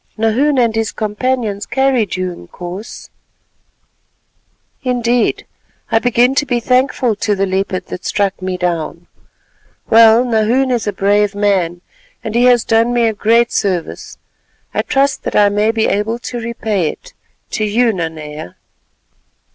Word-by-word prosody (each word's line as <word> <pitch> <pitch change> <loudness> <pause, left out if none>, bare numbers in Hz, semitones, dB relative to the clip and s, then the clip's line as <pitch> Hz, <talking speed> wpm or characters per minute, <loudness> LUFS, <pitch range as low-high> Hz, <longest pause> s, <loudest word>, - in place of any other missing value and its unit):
"Nahoon 245 +7 +1
and 235 -3 +2
his 225 -1 -1
companions 215 -1 -2
carried 265 -6 +1
you, 185 0 -2
Inkoos." 175 - -9 1.7
"Indeed, 245 -2 0 0.5
I 225 - +4
begin 245 +2 +2
to 290 +1 +1
be 245 -2 0
thankful 250 -1 +1
to 210 -1 0
the 195 0 0
leopard 190 -1 -2
that 180 - -7
struck 200 -2 -1
me 185 0 -3
down. 170 -1 -3 0.9
Well, 225 +2 +6
Nahoon 240 +3 +1
is 235 -3 -1
a - - +1
brave 205 +1 +1
man, 190 -4 0 0.4
and 215 - -4
he 240 +2 +3
has 245 -2 +4
done 230 +2 +2
me 240 -1 +3
a 225 - +1
great 230 +3 +2
service. 185 -4 -3 0.6
I - - +1
trust 280 -1 0
that - - -4
I 205 -1 +5
may 205 +2 +1
be 225 -1 +1
able 210 +3 0
to 240 0 -6
repay 220 -7 -2
it—to - - -8
you, 225 +2 +2
Nanea." 155 - -6
220 Hz, 140 wpm, -16 LUFS, 195-240 Hz, 1.7 s, Well